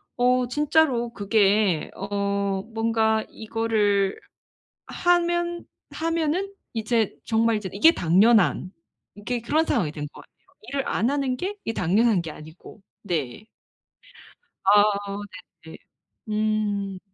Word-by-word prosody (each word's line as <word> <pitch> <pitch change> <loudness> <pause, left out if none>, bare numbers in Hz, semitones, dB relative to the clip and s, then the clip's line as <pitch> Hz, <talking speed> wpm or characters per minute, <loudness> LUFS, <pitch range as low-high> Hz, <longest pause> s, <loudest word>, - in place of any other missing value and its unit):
어 250 0 +2
진짜로 280 -4 +1
그게 205 -4 +1
어 200 0 -2
뭔가 225 -1 +1
이거를 215 -3 0 0.7
하면 345 -1 0 0.3
하면은 330 +4 -1 0.2
이제 225 -1 0
정말 225 0 +2
이제 205 -3 -4
이게 210 +12 +6
당연한 185 +2 +3 0.5
이게 235 +4 -3
그런 305 +7 +1
상황이 205 - 0
된 150 -1 -6
것 - - -13
같아요 - - -21 0.3
일을 275 -1 -2
안 235 +5 +1
하는 275 -3 -1
게 395 +6 -4
이게 225 - -2
당연한 195 +2 +2
게 160 - -7
아니고. 160 +7 -13 0.2
네. 170 - -4 1.2
아. 205 +1 +6 0.8
네네. 160 - -10 0.5
음. 210 -3 -1
220 Hz, 210 characters per minute, -24 LUFS, 200-255 Hz, 1.2 s, 이게